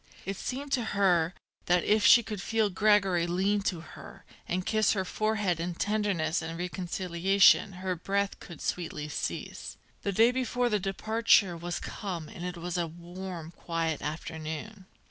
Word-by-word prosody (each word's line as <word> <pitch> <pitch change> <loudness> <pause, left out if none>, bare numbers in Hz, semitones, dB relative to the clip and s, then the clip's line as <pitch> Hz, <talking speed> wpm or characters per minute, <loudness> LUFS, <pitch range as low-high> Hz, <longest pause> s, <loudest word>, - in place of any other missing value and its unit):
It 195 - -3
seemed 275 +7 -5
to 250 -4 +1
her 180 -3 +3 0.3
that 175 0 +3
if 215 0 +3
she 235 +5 +8
could 210 -2 -5
feel 220 -1 +1
Gregory 195 -4 +3
lean 195 +4 +1
to 180 -4 -2
her 170 - -12 0.2
and 180 +1 -1
kiss 215 -2 +3
her 190 -3 -1
forehead 210 -4 0
in 170 +1 -3
tenderness 195 -6 0
and 165 +1 -5
reconciliation 185 +2 +3
her 185 0 -3
breath 200 +3 -1
could 170 - -11
sweetly 155 -4 -3
cease. - - -5 0.2
The 200 - -1
day 225 +5 +5
before 250 -1 0
the 210 -2 +1
departure 200 -1 +2
was 175 +1 -4
come 175 -7 -5
and 175 - -9
it 180 0 -4
was 175 +1 -3
a 170 - 0
warm, 175 0 -8
quiet 165 -2 -2
afternoon. 160 +6 -6
185 Hz, 160 wpm, -29 LUFS, 170-210 Hz, 0.3 s, she